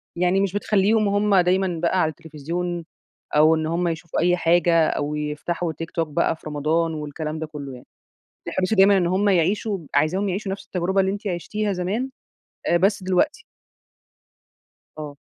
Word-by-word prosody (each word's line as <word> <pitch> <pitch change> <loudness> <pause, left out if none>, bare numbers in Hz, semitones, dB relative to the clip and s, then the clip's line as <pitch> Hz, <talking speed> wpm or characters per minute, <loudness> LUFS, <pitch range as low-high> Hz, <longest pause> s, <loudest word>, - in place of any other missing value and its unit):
يعني 180 +2 +2
مش 195 -1 -1
بتخليهم 205 +1 +2
هم 205 0 +2
دايمًا 180 -1 +2
بقى 180 +2 +2
على 155 - +2
التلفزيون 165 +2 -5 0.5
أو 155 +2 +6
إن 160 0 -2
هم 170 +2 0
يشوفوا 165 0 -3
أي 180 +1 +3
حاجة، 170 -1 +3
أو 145 +1 -2
يفتحوا 155 +3 -3
تيك 165 +2 -7
توك 165 -2 -1
بقى 165 +2 0
في 160 - -12
رمضان 155 +3 0
والكلام 155 +1 -5
ده 160 - -4
كله، 145 -3 -8
يعني. 125 - -12 0.6
بتحرصي 185 +3 0
دايمًا 195 0 +6
إن 180 -3 +2
هم 190 +3 +1
يعيشوا 195 +3 +1 0.2
عايزاهم 190 +6 +2
يعيشوا 195 +1 -3
نفس 195 - -6
التجربة 185 +2 0
اللي 190 0 +1
أنتِ 205 +1 -7
عشتيها 200 +4 -2
زمان، 195 +8 -2 0.6
آآ، 175 - +4
بس 195 +3 +2
دلوقتي. 185 - 0 1.5
آه. 150 -2 -7
175 Hz, 165 wpm, -23 LUFS, 160-195 Hz, 1.5 s, أو